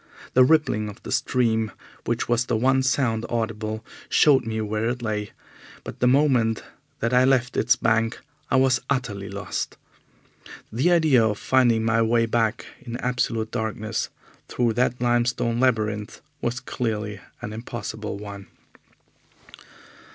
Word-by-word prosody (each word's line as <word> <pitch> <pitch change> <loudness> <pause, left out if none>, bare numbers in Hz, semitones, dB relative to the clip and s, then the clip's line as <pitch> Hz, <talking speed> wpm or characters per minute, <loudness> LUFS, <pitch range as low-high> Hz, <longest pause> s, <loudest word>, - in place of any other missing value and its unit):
The 130 - +7
rippling 125 -7 +2
of 105 - -12
the - - -7
stream, 115 -4 +1 0.3
which - - -1
was 120 0 +2
the - - +1
one 130 +3 +3
sound 125 -4 +1
audible, 110 -2 -3 0.2
showed 135 -6 +4
me 110 0 -2
where 110 +1 -1
it 120 0 -4
lay, 105 -2 -2 0.5
but - - -8
the 125 - +3
moment 125 -5 +3 0.4
that 115 +2 0
I 125 0 +5
left 130 -2 +2
its 125 - +3
bank 115 0 +1 0.3
I - - +2
was 130 -1 +3
utterly 110 -8 -2
lost. 100 0 -4 0.9
The 130 +11 +2
idea 155 -8 +4
of 105 -2 +1
finding 120 -3 +3
my 115 0 +3
way 115 +1 +3
back 115 -1 0 0.2
in 120 -2 -6
absolute 120 -3 -1
darkness 110 0 -2 0.4
through 120 -2 0
that 125 +1 +1
limestone 120 -1 +1
labyrinth 110 -5 0 0.2
was 120 +1 -1
clearly 105 -5 -3 0.2
an 105 -3 -5
impossible 110 -2 -5
one. 100 -1 -9
115 Hz, 140 wpm, -24 LUFS, 110-125 Hz, 0.9 s, The